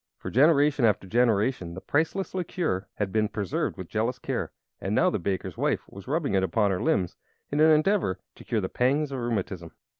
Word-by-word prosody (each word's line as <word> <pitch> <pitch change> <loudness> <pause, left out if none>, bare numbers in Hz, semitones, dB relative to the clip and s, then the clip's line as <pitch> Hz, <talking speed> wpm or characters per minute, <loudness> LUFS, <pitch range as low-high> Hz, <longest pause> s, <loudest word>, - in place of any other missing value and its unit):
For - - -7
generation 145 0 +4
after 105 -4 +3
generation 110 -4 +1
the - - -5
priceless 160 - -1
liquor 170 - -2
had 100 -2 -2
been 110 0 +1
preserved 100 -4 -2
with 95 - -7
jealous 115 +5 -1
care, - - -3 0.3
and - - -2
now - - +4
the - - -1
baker's 95 +1 -3
wife - - +1
was 100 +3 -12
rubbing 150 -1 0
it 95 - +3
upon 100 +2 +1
her 90 - -1
limbs 90 -3 0 0.3
in 145 - 0
an 155 +1 +6
endeavor 155 - +3 0.2
to - - -14
cure 115 -3 -1
the 95 - -1
pangs 140 +7 +1
of 135 - -3
rheumatism! 100 -7 -3
115 Hz, 200 wpm, -27 LUFS, 95-145 Hz, 0.3 s, an